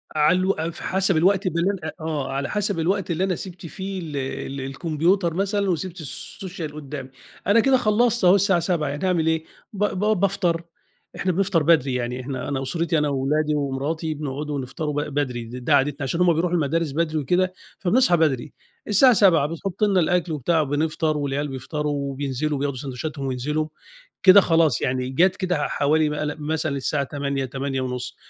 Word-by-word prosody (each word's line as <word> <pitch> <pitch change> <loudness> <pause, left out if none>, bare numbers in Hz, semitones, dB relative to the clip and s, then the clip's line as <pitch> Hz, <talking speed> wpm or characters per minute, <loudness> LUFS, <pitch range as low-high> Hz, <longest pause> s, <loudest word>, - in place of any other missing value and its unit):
على 155 +4 +4
الو 185 +1 +2 0.2
ف 170 - -12
حسب 190 -2 +1
الوقت 190 +3 +3
بالليل 180 +3 +1 0.2
آه. 155 -4 -3
على 140 +1 -2
حسب 205 -4 -1
الوقت 185 +1 0
اللي 170 +3 0
أنا 190 -1 +1
سِبت 180 0 -9
فيه 190 +3 -5
ال 155 -4 -5
ال 135 0 -4
الكمبيوتر 165 +6 0
مثلًا 200 +2 0
وسِبت 180 0 -3
السوشيال 165 +2 -7
قدّامي. 140 -3 -7 0.4
أنا 205 +3 +5
كده 260 +3 +4
خلّصت 235 -1 +2
أهو 180 +2 +7
الساعة 195 -2 +3
07:00 170 -3 0
يعني 145 +6 -3
أعمل 170 -3 +1
إيه؟ 160 0 +1 0.3
ب 205 0 -2
ب 210 0 0
بافطر، 180 -3 +1 0.5
إحنا 185 - 0
بنفطر 185 -2 +1
بدري. 145 -5 +3
يعني 125 0 -2
إحنا 130 +1 -5
أنا 140 -2 -2
أسرتي 165 +4 0
أنا 150 -1 +1
وولادي 150 +3 0
ومراتي 145 +3 -2
بنقعدوا 145 0 -4
ونفطروا 145 +3 -4
ب 145 0 -3
بدري 130 -5 -1
ده 120 +3 -7
ده 125 - +3
عادتنا 140 +1 +1
عشان 165 +6 -1
هم 175 -1 +5
بيروحوا 170 +2 0
المدارس 165 0 0
بدري 160 +1 -1
وكده 180 +6 +1 0.3
فبنصحى 195 -1 +3
بدري. 145 -4 0 0.3
الساعة 240 +5 +6
07:00 170 -9 +4
بتحُط 175 +5 -4
لنا 200 -3 +4
الأكل 175 0 +1
وبتاع 155 +2 +1
بنفطر 155 +2 0
والعيال 145 0 -1
بيفطروا 145 +3 -3
وبينزلوا 140 +1 -2
وبياخدوا 140 -1 -2
ساندويتشاتهم 140 +2 -5
وينزلوا، 150 +5 -1 0.6
كده 195 +1 +9
خلاص 165 -8 +2
يعني 130 0 -1
جات 175 +7 +3
كده 185 -2 -1
ع 150 - -1
حوالي 150 +1 +2
م - - -3
لأ 150 0 -2
مثلًا 150 -1 -1
الساعة 140 +2 0
08:00 140 -1 -2
08:30 130 -1 -3
155 Hz, 180 wpm, -23 LUFS, 140-180 Hz, 0.6 s, كده